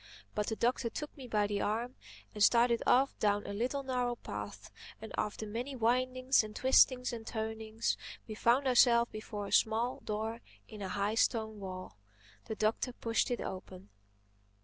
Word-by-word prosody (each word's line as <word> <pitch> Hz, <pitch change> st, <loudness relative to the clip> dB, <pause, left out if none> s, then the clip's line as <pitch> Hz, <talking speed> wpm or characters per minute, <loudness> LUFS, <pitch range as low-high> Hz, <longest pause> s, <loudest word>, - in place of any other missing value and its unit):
But 210 Hz, -1 st, -1 dB
the 220 Hz, -, -1 dB
Doctor 240 Hz, +1 st, +1 dB
took 300 Hz, +6 st, -6 dB
me 265 Hz, -3 st, -9 dB
by 210 Hz, -3 st, +1 dB
the 205 Hz, -1 st, -1 dB
arm 230 Hz, +4 st, -1 dB, 0.4 s
and 210 Hz, -, +1 dB
started 235 Hz, +1 st, +5 dB
off 270 Hz, +2 st, +4 dB
down 205 Hz, -1 st, +1 dB
a -, -, -5 dB
little 255 Hz, +6 st, -1 dB
narrow 250 Hz, -2 st, -1 dB
path -, -, -7 dB, 0.3 s
and 220 Hz, -, -9 dB
after 210 Hz, +1 st, -2 dB
many 240 Hz, +6 st, -4 dB
windings 255 Hz, +2 st, +2 dB
and 215 Hz, 0 st, -8 dB
twistings 255 Hz, -1 st, +4 dB
and 225 Hz, -1 st, -7 dB
turnings 220 Hz, 0 st, -2 dB, 0.3 s
we 220 Hz, -, -5 dB
found 235 Hz, +5 st, +3 dB
ourselves 240 Hz, -2 st, +5 dB
before 215 Hz, -1 st, -6 dB
a -, -, -7 dB
small 230 Hz, +3 st, +2 dB
door 220 Hz, +2 st, -3 dB, 0.3 s
in 215 Hz, -2 st, -10 dB
a 190 Hz, -, -3 dB
high 200 Hz, +2 st, 0 dB
stone 220 Hz, -1 st, +1 dB
wall. 185 Hz, -, -7 dB, 0.5 s
The 220 Hz, -, -4 dB
Doctor 215 Hz, +4 st, 0 dB
pushed 230 Hz, -1 st, 0 dB
it 245 Hz, -, -1 dB
open. 185 Hz, +1 st, -7 dB
225 Hz, 170 wpm, -33 LUFS, 210-245 Hz, 0.5 s, started